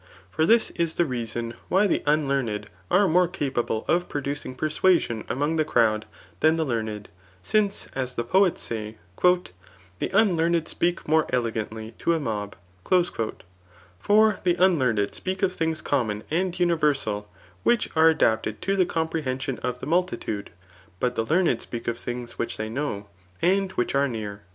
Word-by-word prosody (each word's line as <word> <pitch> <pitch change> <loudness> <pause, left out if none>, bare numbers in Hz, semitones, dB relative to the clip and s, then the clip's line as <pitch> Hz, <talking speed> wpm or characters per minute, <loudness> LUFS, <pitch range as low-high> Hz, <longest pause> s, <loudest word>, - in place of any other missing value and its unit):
For 160 - +1
this 230 0 +4
is 170 -2 -1
the 175 - +3
leuon 120 -3 -3 0.2
why:the 195 +1 +3
unldaraed 140 -8 0 0.2
aie 195 +1 +4
mose 180 +1 +3
capable, 120 -5 -1
of 175 +1 +1
prodttdi^ 140 -2 -4
persuasiiHi 155 - +1
among 145 +5 0
the 155 - +3
cfovd, 110 -7 +2 0.3
than 155 +1 +4
the 160 -1 0
karned, 110 -5 -3 0.4
since 205 - +1
as 130 -2 -3
the 120 - -1
poets 185 +8 +2
say; 110 -1 -5 0.2
*^ 180 0 +3 0.5
The - - -1
unkamrd 170 -5 +3 0.2
^peak 175 0 0
more 155 0 +3
eiegmitiy 115 -2 -3
to 170 - +2
a - - -1
mob.'' 105 -7 -3 1.4
For 215 - +4
the 175 -1 +3
unltsacMd 130 - +2
speak 190 +1 -4
of 185 -1 +2
things 160 -2 -2
common 110 -7 0
and 180 +2 0
universal,, 145 -12 +1 0.3
[which 240 -2 +2
zte 160 +1 +6
adapted 110 -8 +1
to 195 +2 +1
the 185 -2 +3
xomprehoision 135 -6 -2
of 125 0 -3
the - - -4
mukitnde;} 160 - -1 0.5
hot 125 0 0
the 115 - 0
leamed 160 -8 +2
speak 115 -1 -6
of 120 0 -1
things 120 -1 -6
which - - -2
they 110 0 -4
know^ 120 -6 -3 0.3
and 190 +1 +1
vrhich 120 - 0
are 140 +1 +3
near. 105 -4 -5
145 Hz, 155 wpm, -25 LUFS, 115-175 Hz, 1.4 s, zte